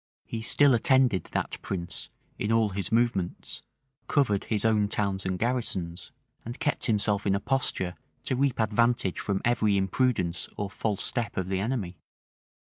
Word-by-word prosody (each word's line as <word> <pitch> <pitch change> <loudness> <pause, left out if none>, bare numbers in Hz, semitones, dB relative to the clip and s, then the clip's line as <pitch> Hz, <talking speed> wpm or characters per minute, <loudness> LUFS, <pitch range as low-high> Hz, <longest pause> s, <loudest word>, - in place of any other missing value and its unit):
He 115 - -5
still 140 +4 +5
attended 125 -3 +3
that - - -3
prince 85 -3 -4 0.3
in 105 - -1
all 115 -2 +3
his 95 -2 -4
movements; 115 -6 0 0.5
covered 115 -9 +2
his 105 -1 -1
own 105 -2 +3
towns 100 -3 -1
and 95 0 -1
garrisons; 95 -6 -2 0.3
and 120 +3 -7
kept 150 -2 0
himself 105 -2 +1
in 100 - +3
a - - 0
posture 100 -7 0 0.3
to 130 - -1
reap 135 -1 +1
advantage 110 -2 +2
from 100 -2 -2
every 110 -4 +3
imprudence 95 -4 0
or 100 -1 -3
false 105 -2 -1
step 120 -4 -1
of 95 -1 -1
the 95 -1 0
enemy. 100 -6 -3
105 Hz, 155 wpm, -28 LUFS, 95-120 Hz, 0.5 s, still